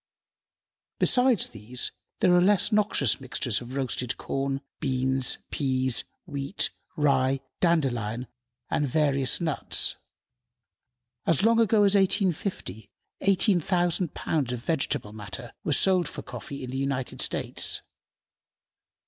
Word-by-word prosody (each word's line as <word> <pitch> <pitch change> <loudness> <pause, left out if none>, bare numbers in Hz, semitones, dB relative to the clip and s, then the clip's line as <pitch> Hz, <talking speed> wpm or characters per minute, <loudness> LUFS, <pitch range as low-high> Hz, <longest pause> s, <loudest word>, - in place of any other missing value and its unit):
Besides 250 -5 +3
these, 115 +3 -3 0.3
are 180 -1 +6
less 200 +3 +3
noxious 205 - +2
mixtures 125 -3 -1
of 125 +2 -8
roasted 130 -3 -1
corn, 135 0 -2 0.2
beans, 130 -1 +1
peas, 130 -3 +1 0.2
wheat, 140 0 -2 0.2
rye, 135 -3 +2 0.2
dandelion, 125 - +1 0.5
and 145 - +1
various 140 -2 +1
nuts. 160 -5 +1 1.3
As 165 +2 +3
long 230 +1 +4
ago 220 -2 +4
as 200 -1 +4
1850, 190 - 0 0.3
18,000 180 -3 +2
pounds 145 -6 -1
of 120 -1 -5
vegetable 140 -8 -1
matter 105 +2 -7
were - - -1
sold 180 +2 +4
for - - -8
coffee 125 +3 -7
in 125 - -6
the 135 - -3
United 135 -2 -2
States. - - -1
140 Hz, 110 wpm, -27 LUFS, 125-180 Hz, 1.3 s, are